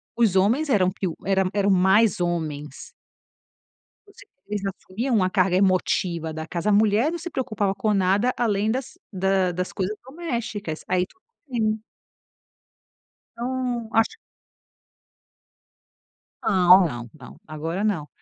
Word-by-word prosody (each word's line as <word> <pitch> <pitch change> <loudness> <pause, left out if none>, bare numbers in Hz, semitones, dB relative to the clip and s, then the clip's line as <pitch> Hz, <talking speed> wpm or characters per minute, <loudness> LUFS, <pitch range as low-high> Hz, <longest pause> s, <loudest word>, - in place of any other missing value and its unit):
os 225 -5 +2
homens 240 +11 +2
eram, 190 -6 +3
piu 185 -3 -4
eram, 190 -1 +1
eram 200 0 +1
mais 195 +3 +4
homens. 155 - -3 1.2
Você 405 +4 -16
vê, 200 +3 -10
eles 205 - -2
assumiam 205 +6 -3
uma 185 -4 +2
carga 185 -2 +2
emotiva 180 -3 +1
da 160 0 -6
casa, 170 +5 -3
a - - +4
mulher 215 +7 +3
não 345 - -4
se 350 +2 -6
preocupava 215 -7 -1
com 215 0 0
nada 200 +6 +2
além 215 -2 +1
das 255 +2 -4
da 190 -1 +1
das 180 +1 -3
coisas 200 +2 -2
domésticas, 235 - -5
aí 180 0 +1
tudo 370 - -28 0.3
bem. 220 -3 -1 1.5
Então 245 -1 -3
acho 225 0 +2 2.3
Não, 185 -2 +6
não, 120 -5 -6
não, 125 - -13
agora 165 +6 -4
não. 165 -9 -1
195 Hz, 130 wpm, -24 LUFS, 180-225 Hz, 2.3 s, Não